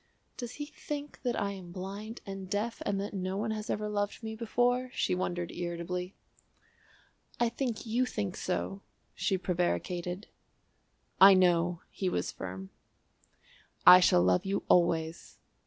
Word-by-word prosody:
("Does 245 -2 -6
he 295 - -5
think 295 -1 -7
that 245 -2 -1
I 200 0 -1
am 185 -3 -9
blind 200 +5 -6
and 195 -2 -7
deaf 215 +3 -2
and 200 -1 0
that 200 +1 -4
no 190 0 -2
one 220 +2 -1
has 215 0 -4
ever 210 0 -1
loved 205 +1 -2
me 220 0 -4
before?" 245 +3 +1
she - - +1
wondered 175 -1 -2
irritably.) 175 +1 -4 1.2
"I 240 - +3
think 240 -1 -3
you 240 +3 +1
think 195 -6 -3
so," 195 +2 -3 0.3
she 190 - 0
prevaricated. 180 - -2 1.0
"I 195 0 +10
know," 175 -1 +3
he 190 - -1
was 90 - -1
firm. 95 +1 -7 1.1
"I 180 - +11
shall 90 - +5
love 90 0 +3
you 195 +1 -1
always." 165 -2 +2
195 Hz, 145 wpm, -31 LUFS, 175-220 Hz, 1.2 s, I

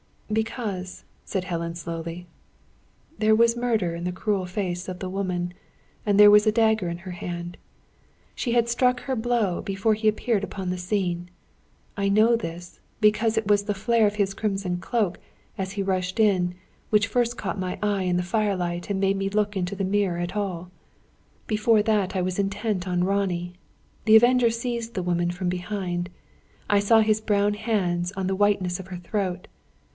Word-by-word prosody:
"Because," 215 -4 -3 0.2
said 190 -3 -2
Helen, 170 -2 -3
slowly, 170 +1 -6 0.9
"there 215 0 +4
was 230 +1 +4
murder 225 -8 0
in 170 +1 -5
the 180 - -2
cruel 195 0 -1
face 180 -1 -3
of 185 -1 -5
the 185 - -4
woman, 180 -2 -2 0.5
and 205 -2 +2
there 205 0 +10
was 210 +1 +6
a 215 - +4
dagger 220 -4 +2
in 170 0 -4
her 185 +1 -8
hand. 175 0 -6 0.8
She 235 - -2
had 235 -1 +3
struck 250 +1 +2
her 265 - -2
blow 225 -6 0
before 195 +3 0
he 215 +1 -1
appeared 215 0 +1
upon 190 -2 -4
the 180 - -2
scene. 180 -2 -2 0.7
I 200 0 +1
know 215 +4 +4
this, 175 -4 -6 0.2
because 220 +1 +3
it 220 - +1
was 205 0 +3
the 205 0 -1
flare 225 +2 +3
of 205 - -2
his 200 -2 0
crimson 195 -3 -2
cloak, 200 -1 -1 0.4
as 190 0 -3
he 200 -1 -2
rushed 185 +1 -1
in, 185 -5 +3 0.4
which 210 -1 +4
first 240 +2 0
caught 195 -1 -3
my 185 -1 -3
eye, 205 -2 +1
in 180 -1 +1
the 180 - 0
firelight, 180 -3 -1
and 200 -1 -1
made 195 0 +2
me 195 0 -1
look 210 0 0
into 180 +1 -2
the 195 - -2
mirror 195 -2 +1
at 175 +3 -3
all. 180 -4 -3 0.7
Before 215 0 +3
that 205 -4 +1
I 185 - +1
was 185 +1 -2
intent 195 -1 -1
on 180 -1 +1
Ronnie. 180 -2 -1 0.5
The 220 -1 +7
Avenger 240 +1 +6
seized 235 0 -3
the 185 - -1
woman 175 -1 0
from 180 +1 -2
behind; 180 -1 -3 0.6
I 205 - +4
saw 220 +2 +5
his 215 0 +2
brown 205 -1 +2
hands 190 -5 -1
on 190 -1 -2
the 190 - 0
whiteness 190 -3 +1
of 190 - -8
her 185 -1 -6
throat. 185 0 -3
195 Hz, 180 wpm, -25 LUFS, 180-215 Hz, 0.9 s, there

